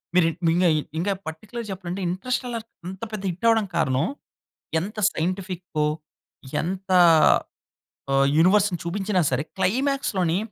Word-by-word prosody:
మిర్ 180 Hz, -2 st, +5 dB, 0.2 s
మింగాయ్ 165 Hz, -1 st, +3 dB, 0.2 s
ఇంకా 200 Hz, +4 st, +1 dB
పార్టిక్యులర్‌గా 215 Hz, +8 st, -6 dB
చెప్పలంటే, 185 Hz, 0 st, -5 dB
'ఇంటర్స్టెల్లార్' 240 Hz, +3 st, -3 dB, 0.2 s
అంత 190 Hz, +1 st, -8 dB
పెద్ద 210 Hz, -2 st, -4 dB
హిట్ 175 Hz, +6 st, -7 dB
అవడానికి 220 Hz, -5 st, +1 dB
కారణం, 140 Hz, -1 st, +1 dB, 0.7 s
ఎంత 210 Hz, +5 st, -7 dB, 0.2 s
సైంటిఫికొ 180 Hz, -2 st, -2 dB, 0.8 s
ఎంత 190 Hz, +3 st, -4 dB, 1.2 s
ఆహ్, 135 Hz, 0 st, +4 dB
యూనివర్స్‌ని 190 Hz, +2 st, +4 dB
చూపించినా 190 Hz, +2 st, 0 dB
సరే, 130 Hz, +2 st, +1 dB, 0.2 s
క్లైమాక్స్‌లోని 215 Hz, -, +1 dB
185 Hz, 110 wpm, -24 LUFS, 170-210 Hz, 1.2 s, మిర్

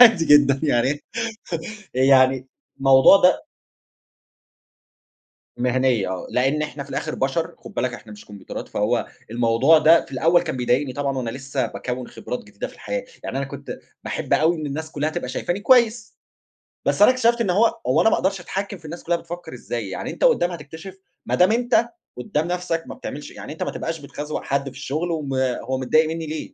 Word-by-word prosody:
عادي 225 Hz, -9 st, +8 dB
جدًا 140 Hz, -3 st, +5 dB
يعني 145 Hz, 0 st, +1 dB, 0.9 s
يعني 130 Hz, 0 st, +4 dB, 0.3 s
الموضوع 135 Hz, +7 st, +7 dB
ده 180 Hz, 0 st, +4 dB, 2.1 s
مِهَنية 125 Hz, -4 st, +1 dB
آه. 95 Hz, -1 st, -4 dB
لإن 135 Hz, +4 st, +1 dB
إحنا 150 Hz, -1 st, -5 dB
في 140 Hz, -, -15 dB
الآخر -, -, -3 dB
بَشَر 140 Hz, +5 st, -1 dB
خُد -, -, -12 dB
بالك 120 Hz, 0 st, -1 dB
إحنا 110 Hz, -3 st, -11 dB
مش 105 Hz, 0 st, -12 dB
كومبيوترات. 100 Hz, -1 st, -8 dB
فهو 115 Hz, +3 st, 0 dB, 0.2 s
الموضوع 120 Hz, +7 st, +4 dB
ده 165 Hz, +2 st, +5 dB
في -, -, -16 dB
الأول 165 Hz, +6 st, +3 dB
كان -, -, -4 dB
بيضايقني 130 Hz, +2 st, 0 dB
طبعًا 140 Hz, 0 st, -2 dB
وأنا 120 Hz, -3 st, -3 dB
لسّه 135 Hz, +2 st, -3 dB
باكوِّن 125 Hz, 0 st, -5 dB
خبرات 125 Hz, -, -6 dB
جديدة 105 Hz, -1 st, -6 dB
في -, -, -14 dB
الحياة. 255 Hz, 0 st, -4 dB, 0.2 s
يعني -, -, -4 dB
أنا 140 Hz, -, -1 dB
كنت -, -, -8 dB, 0.3 s
باحب -, -, -4 dB
أوي 165 Hz, +3 st, +3 dB
إن 155 Hz, -2 st, -4 dB
الناس 155 Hz, +3 st, -5 dB
كُلّها 150 Hz, +1 st, -1 dB
تبقى 125 Hz, -, -4 dB
شايفاني 175 Hz, +9 st, -2 dB
كويس، 230 Hz, -1 st, +3 dB, 0.7 s
بس -, -, +2 dB
أنا 210 Hz, -, +9 dB
اكتشفت 240 Hz, -2 st, +2 dB
إن 210 Hz, -5 st, +1 dB
هو 215 Hz, +6 st, +2 dB
هو 130 Hz, +6 st, +3 dB
أنا 225 Hz, -, +5 dB
ما -, -, +3 dB
أقدرش 195 Hz, 0 st, 0 dB
أتحكِّم 195 Hz, +2 st, -4 dB
في 165 Hz, -, -25 dB
الناس 165 Hz, +3 st, -8 dB
كُلّها 170 Hz, +1 st, +1 dB
بتفكر 170 Hz, -3 st, -8 dB
إزاي؟ 115 Hz, -4 st, -5 dB
يعني -, -, -4 dB
أنت -, -, -3 dB
قدّام 475 Hz, -, +4 dB
هتكتشف 165 Hz, +3 st, -9 dB, 0.3 s
ما -, -, -1 dB
دام 180 Hz, +4 st, +4 dB
أنت 235 Hz, 0 st, +2 dB, 0.3 s
قدّام 165 Hz, -6 st, -2 dB
نفسك 175 Hz, -2 st, -2 dB
ما -, -, -7 dB
بتعملش 145 Hz, -, -7 dB
يعني -, -, -9 dB
أنت 160 Hz, -, -7 dB
ما -, -, -1 dB
تبقاش 165 Hz, 0 st, -4 dB
بتخزوَق 145 Hz, +1 st, -5 dB
حد 140 Hz, 0 st, 0 dB
في 130 Hz, -, -16 dB
الشغل 160 Hz, +6 st, -3 dB
وما 135 Hz, -5 st, -1 dB
هو 130 Hz, +2 st, -3 dB
متضايق 155 Hz, +5 st, +3 dB
منّي 165 Hz, 0 st, -4 dB
ليه؟ 155 Hz, 0 st, -6 dB
150 Hz, 190 wpm, -22 LUFS, 130-175 Hz, 2.1 s, أنا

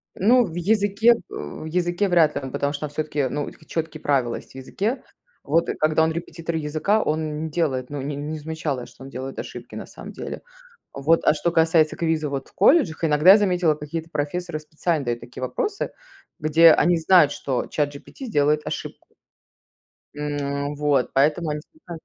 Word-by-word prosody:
Ну, 240 Hz, +5 st, +4 dB
в 165 Hz, -4 st, -8 dB
языке, 205 Hz, +4 st, +3 dB
э, -, -, +8 dB, 0.2 s
в 75 Hz, -, -7 dB
языке 175 Hz, +4 st, 0 dB
вряд 165 Hz, -4 st, +4 dB
ли 140 Hz, -, -2 dB
он, 135 Hz, -1 st, -6 dB
потому 140 Hz, +2 st, -1 dB
что 145 Hz, -, -6 dB
там 150 Hz, -, -3 dB
всё-таки, 150 Hz, -2 st, -2 dB
ну, 145 Hz, +2 st, -2 dB
хоть -, -, -13 dB
чёткие 160 Hz, -2 st, -4 dB
правила 130 Hz, -5 st, +1 dB
есть -, -, -10 dB
в -, -, -22 dB
языке. 200 Hz, -, -3 dB, 0.4 s
Вот 165 Hz, +3 st, +1 dB
когда 155 Hz, +1 st, +3 dB
он 160 Hz, -, +2 dB
репетитор 165 Hz, 0 st, -5 dB
языка, 160 Hz, +8 st, +1 dB
он 155 Hz, -2 st, -2 dB
не 160 Hz, -, -4 dB
делает, 140 Hz, -6 st, -1 dB
ну, 145 Hz, -1 st, -4 dB
не 140 Hz, +2 st, -4 dB
не 150 Hz, +2 st, -4 dB
замечала, 150 Hz, -4 st, -4 dB
что -, -, -15 dB
он 135 Hz, -, -9 dB
делает 135 Hz, 0 st, -6 dB
ошибки -, -, -8 dB
на -, -, -6 dB
самом -, -, -10 dB
деле. -, -, -7 dB, 0.5 s
Вот, 155 Hz, +4 st, +2 dB
а -, -, +5 dB
что 170 Hz, +3 st, -1 dB
касается 160 Hz, -1 st, +3 dB
квиза 160 Hz, -3 st, 0 dB
вот 135 Hz, -1 st, -5 dB
в -, -, -29 dB
колледжах, 205 Hz, -, +3 dB
иногда, 150 Hz, +4 st, +6 dB
я 205 Hz, -, +9 dB
заметила, 180 Hz, -6 st, +2 dB
какие-то 160 Hz, +2 st, -6 dB
профессоры 160 Hz, +3 st, -3 dB
специально 155 Hz, 0 st, -2 dB
дают 120 Hz, 0 st, -2 dB
такие 120 Hz, -, -10 dB
вопросы, 400 Hz, -, -2 dB, 0.5 s
где 160 Hz, +1 st, +6 dB
они 175 Hz, +2 st, +4 dB
знают, 160 Hz, -2 st, +5 dB
что 135 Hz, -3 st, -2 dB
Чат 145 Hz, -1 st, -1 dB
GPT 265 Hz, -, -10 dB
сделает 150 Hz, -, +1 dB
ошибку. -, -, -6 dB, 1.1 s
М, 145 Hz, -1 st, -3 dB
вот, 145 Hz, -3 st, +1 dB
поэтому 150 Hz, +4 st, +2 dB
они 150 Hz, 0 st, -3 dB, 0.2 s
знают, 170 Hz, -3 st, -8 dB
155 Hz, 190 wpm, -23 LUFS, 145-170 Hz, 1.1 s, я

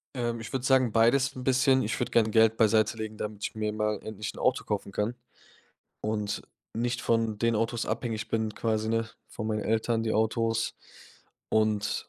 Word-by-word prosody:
Ähm, 120 Hz, -2 st, -2 dB
ich 115 Hz, -, -8 dB
würde 130 Hz, -1 st, -2 dB
sagen, 130 Hz, -4 st, +4 dB
beides 130 Hz, +5 st, +3 dB
'n 130 Hz, -, -6 dB
bisschen. 130 Hz, 0 st, +4 dB
Ich 110 Hz, +2 st, -2 dB
würde 125 Hz, -, -1 dB
gerne 110 Hz, -2 st, +3 dB
Geld 110 Hz, 0 st, +4 dB
beiseitelegen, 110 Hz, 0 st, +2 dB
damit 105 Hz, -1 st, -5 dB
ich -, -, -3 dB
mir 110 Hz, -1 st, -2 dB
mal 105 Hz, -1 st, -1 dB
endlich 110 Hz, 0 st, -5 dB
'n -, -, -11 dB
Auto 130 Hz, -, +1 dB
kaufen 100 Hz, -1 st, -3 dB
kann 105 Hz, +4 st, -1 dB, 0.9 s
und 105 Hz, -1 st, -2 dB, 0.3 s
nicht 120 Hz, +1 st, -1 dB
von 115 Hz, -2 st, +1 dB
den 115 Hz, +1 st, +2 dB
Autos 115 Hz, +1 st, -1 dB
abhängig 110 Hz, -4 st, -3 dB
bin 110 Hz, -2 st, -1 dB
quasi, 110 Hz, -1 st, -1 dB
ne 115 Hz, 0 st, 0 dB, 0.2 s
von 110 Hz, -, -6 dB
meinen 110 Hz, -1 st, -1 dB
Eltern 115 Hz, +1 st, +1 dB
die 110 Hz, -1 st, -1 dB
Autos. 115 Hz, +1 st, +1 dB, 0.8 s
Und 110 Hz, -1 st, +1 dB
110 Hz, 180 wpm, -28 LUFS, 110-115 Hz, 0.9 s, sagen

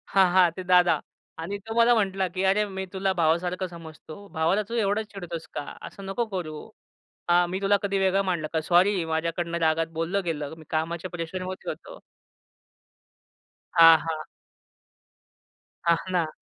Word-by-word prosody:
हां, 190 Hz, -1 st, +6 dB
हां. 180 Hz, -3 st, +6 dB
ते 185 Hz, -, -6 dB
दादा. 180 Hz, -1 st, +6 dB, 0.5 s
आणि 200 Hz, +4 st, -4 dB
तो 225 Hz, -, -5 dB
मला 235 Hz, +1 st, +6 dB
म्हटला 195 Hz, -2 st, 0 dB
की 185 Hz, -, -1 dB
"अरे! 210 Hz, +1 st, +2 dB
मी 190 Hz, -1 st, -5 dB
तुला 190 Hz, 0 st, 0 dB
भावासारखं 175 Hz, +3 st, +1 dB
समजतो. 160 Hz, -1 st, -11 dB, 0.2 s
भावाला 175 Hz, +7 st, +2 dB
तू 235 Hz, -, -6 dB
एवढं 205 Hz, +2 st, 0 dB
चिडतोस 170 Hz, -4 st, -7 dB
का. -, -, -2 dB, 0.3 s
असं 195 Hz, -, -11 dB
नको 235 Hz, +4 st, -1 dB
करू. 155 Hz, -4 st, -4 dB, 0.8 s
हां. 175 Hz, 0 st, +5 dB
मी 190 Hz, +2 st, -3 dB
तुला 200 Hz, +1 st, +3 dB
कधी 195 Hz, 0 st, 0 dB
वेगळं 190 Hz, +1 st, +3 dB
मानलं 155 Hz, -3 st, -2 dB
का? 160 Hz, -, +1 dB
सॉरी. 185 Hz, +4 st, +5 dB, 0.2 s
माझ्याकडनं 170 Hz, +1 st, -2 dB
रागात 160 Hz, +1 st, +2 dB
बोललं 185 Hz, +4 st, -1 dB
गेलं. 150 Hz, -2 st, -3 dB
मी 160 Hz, -, -13 dB
कामाच्या 170 Hz, +3 st, -3 dB
प्रेशरमध्ये 185 Hz, +3 st, -5 dB
होतो." -, -, -9 dB, 1.8 s
हां, 165 Hz, -1 st, +9 dB
हां. 160 Hz, -1 st, -2 dB, 1.7 s
हां 170 Hz, 0 st, +5 dB, 0.2 s
ना. 170 Hz, -3 st, +1 dB
180 Hz, 155 wpm, -26 LUFS, 165-195 Hz, 1.8 s, हां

